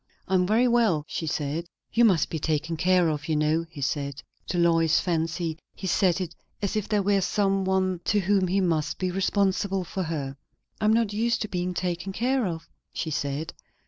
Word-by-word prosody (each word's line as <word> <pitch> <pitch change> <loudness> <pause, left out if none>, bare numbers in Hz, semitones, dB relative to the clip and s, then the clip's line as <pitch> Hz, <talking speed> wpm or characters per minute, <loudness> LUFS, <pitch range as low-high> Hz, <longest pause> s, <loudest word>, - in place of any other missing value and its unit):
"I 190 - -3
am 180 -1 +3
very 230 +5 +4
well," 225 -11 +2
she 160 - -4
said. 150 +3 -2 0.3
"You 235 0 +5
must 185 -8 +3
be 160 - -2
taken 155 +1 -1
care 180 +1 +3
of, 150 -1 -2
you 155 - +2
know," 155 +2 +1
he 155 -4 -9
said; 140 0 -2 0.2
to 180 - -2
Lois's 165 -2 +4
fancy 165 -1 -1 0.2
he 190 - -7
said 185 0 +2
it 175 -3 -4 0.3
as 200 +1 -2
if 215 -1 -2
there 210 -2 +2
were 200 0 +3
some 195 0 +1
one 185 -2 +1
to 205 0 +2
whom 195 0 +2
he 195 +2 +1
must 160 -3 0
be 185 -1 -1
responsible 195 0 +1
for 190 +2 -4
her. 145 -5 -3 0.4
"I - - -1
am 215 - +5
not 225 -2 +2
used 230 +2 +1
to - - -4
being 180 -1 -2
taken 180 +1 -2
care 250 +1 +1
of," 165 -2 -5 0.2
she 160 - -3
said. 145 +2 -2
180 Hz, 205 wpm, -26 LUFS, 160-195 Hz, 0.4 s, You